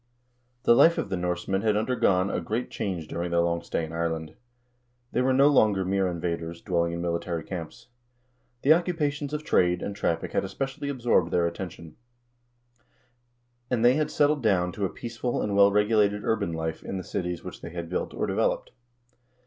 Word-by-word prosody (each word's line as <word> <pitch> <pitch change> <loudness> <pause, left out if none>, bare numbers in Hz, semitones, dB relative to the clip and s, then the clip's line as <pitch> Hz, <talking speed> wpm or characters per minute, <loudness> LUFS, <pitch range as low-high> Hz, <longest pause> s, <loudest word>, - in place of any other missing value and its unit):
The - - +6
life 165 +8 +6
of - - -2
the 95 - -1
Norsemen 90 +2 -1
had 105 -1 +2
undergone 100 -5 +2
a - - -1
great 115 +4 -3
change 90 -6 -3
during 85 +1 -3
their 85 0 +1
long 85 0 0
stay 85 - -2
in 80 - -10
Ireland. 80 -1 -2 0.8
They 125 - +1
were 130 +1 +2
no 135 +2 +5
longer 105 -9 +3
mere 95 0 +1
invaders, 85 -1 -3
dwell 85 -1 0
ing 85 - -3
in 85 0 -3
military 85 -1 -2
camps. 85 -3 -7 0.8
The 145 - +7
occupations 150 -4 -1
of 150 0 -3
trade 90 - +2
and 100 - -4
traffic 85 -5 -1
had - - 0
especially 135 +1 -4
absorbed 120 -10 +2
their 85 0 +2
attention, 85 -2 -6 1.7
and 120 -2 +1
they 125 - +7
had 150 +2 0
settled 145 0 +2
down 90 -6 +2
to 100 +3 -2
a - - -1
peaceful 120 +1 -4
and 105 -1 -1
well 100 0 +6
regulated 105 0 +2
urban 110 -6 0
life 80 0 -3
in 95 - -5
the 95 - -5
cities 90 -1 -4
which - - -9
they - - -7
had 85 0 -6
built 90 - -3
or - - -2
developed. - - 0
95 Hz, 185 wpm, -27 LUFS, 85-120 Hz, 1.7 s, The